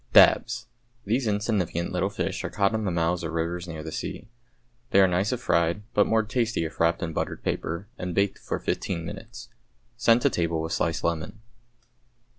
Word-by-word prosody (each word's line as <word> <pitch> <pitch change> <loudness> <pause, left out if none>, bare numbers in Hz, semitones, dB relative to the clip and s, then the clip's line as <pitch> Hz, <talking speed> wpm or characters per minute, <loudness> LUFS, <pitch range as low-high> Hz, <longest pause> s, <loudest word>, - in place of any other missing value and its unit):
=Dabs.= - - +6 0.4
These 115 +4 +1
insignificant 100 -5 0
little - - 0
fish - - -3
are - - -2
caught 100 +1 +1
in 110 -1 -1
the - - +1
mouths 85 +1 0
of 85 0 -3
rivers 85 +2 -2
near 80 -2 -6
the 80 - -6
sea. 105 +7 -5 0.6
They 100 - +5
are 95 - +7
nice 90 +3 +1
if 125 -1 -2
fried, 85 0 +1
but 105 - +4
more 110 0 +3
tasty 115 -4 0
if 80 - -7
wrapped 85 +1 +2
in 80 -1 -3
buttered - - -3
paper 85 +5 -2
and 90 -1 -3
baked 100 0 +1
for - - -3
fifteen 85 -3 -2
minutes. 115 +6 -8 0.5
Send 120 0 +4
to - - +4
table 85 -2 0
with 80 +1 -2
sliced 80 +1 0
lemon. 85 +5 -2
90 Hz, 190 wpm, -26 LUFS, 85-105 Hz, 0.6 s, are